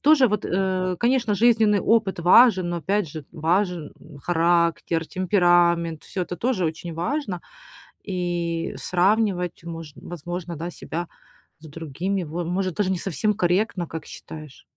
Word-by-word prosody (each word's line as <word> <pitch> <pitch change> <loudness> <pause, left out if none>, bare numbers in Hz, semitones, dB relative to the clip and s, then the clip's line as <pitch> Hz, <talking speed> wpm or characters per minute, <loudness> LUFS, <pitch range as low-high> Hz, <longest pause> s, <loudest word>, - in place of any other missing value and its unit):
Тоже 290 -4 +5
вот, 210 -1 -1
э, 185 0 0
конечно, 235 -3 +2
жизненный 220 -2 +4
опыт 215 -5 +2
важен, 185 0 +6
но 175 - -2
опять 195 +2 0
же 150 0 -8
важен 170 0 0 0.3
характер, 170 -1 +1
темперамент, 175 -3 +2
всё 185 - -3
это 175 0 -5
тоже 235 -7 0
очень 160 +1 -4
важно. 195 - -2 0.6
И 175 -3 -2
сравнивать, 185 -2 +1
мож 165 -2 -7
возможно, 175 0 -6
да, 170 +3 -5
себя 170 0 -5 0.5
с 155 - -12
другими, 165 +5 -3
во 170 +2 -4
может 185 0 -1
даже 195 -2 +1
не 190 - 0
совсем 195 +4 0
корректно, 180 -2 0
как 160 - -7
считаешь? 155 -3 -10
175 Hz, 140 wpm, -24 LUFS, 170-200 Hz, 0.6 s, важен